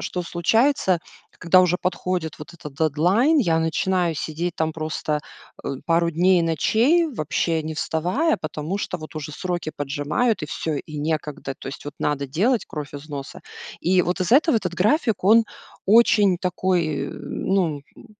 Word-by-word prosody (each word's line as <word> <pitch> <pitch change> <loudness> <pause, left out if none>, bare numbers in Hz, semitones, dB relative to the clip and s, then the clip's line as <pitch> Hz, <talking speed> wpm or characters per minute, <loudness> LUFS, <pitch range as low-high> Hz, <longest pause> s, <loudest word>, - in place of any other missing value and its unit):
что 180 - -3
случается, 190 - +2 0.4
когда 185 +2 +5
уже 180 -1 +3
подходит 180 -3 -2
вот 150 +3 -10
этот 150 -5 -10
дедлайн, 180 - +3
я 170 - +2
начинаю 170 +1 0
сидеть 160 +4 -3
там 160 0 0
просто, 155 -1 -2 0.4
э, - - -3 0.2
пару 170 0 +2
дней 180 +3 +3
и - - +1
ночей, 230 - +3
вообще 160 - -1
не 155 0 -5
вставая, 180 - 0
потому 155 +5 -4
что 180 - -3
вот 155 0 -10
уже 150 0 -5
сроки 175 -1 -3
поджимают, 145 - -1
и - - -2
всё, 155 +1 -3
и 150 +1 -7
некогда. 150 -2 -3
То - - -7
есть, 140 - -8
вот, 145 - -7
надо 140 -1 -1
делать 210 - +1
кровь 150 -1 -7
из 145 +2 -9
носа. 140 -2 -7 0.4
И 185 +1 +3
вот 180 +2 -2
из-за 205 +9 +5
этого 315 -4 +3
этот 180 -5 -2
график, 215 - +1
он 225 +3 +6 0.4
очень 205 -3 +5
такой, 175 -5 0
э, - - -7
ну, 175 -7 -1 0.2
м, - - -15
170 Hz, 170 wpm, -23 LUFS, 155-190 Hz, 0.4 s, он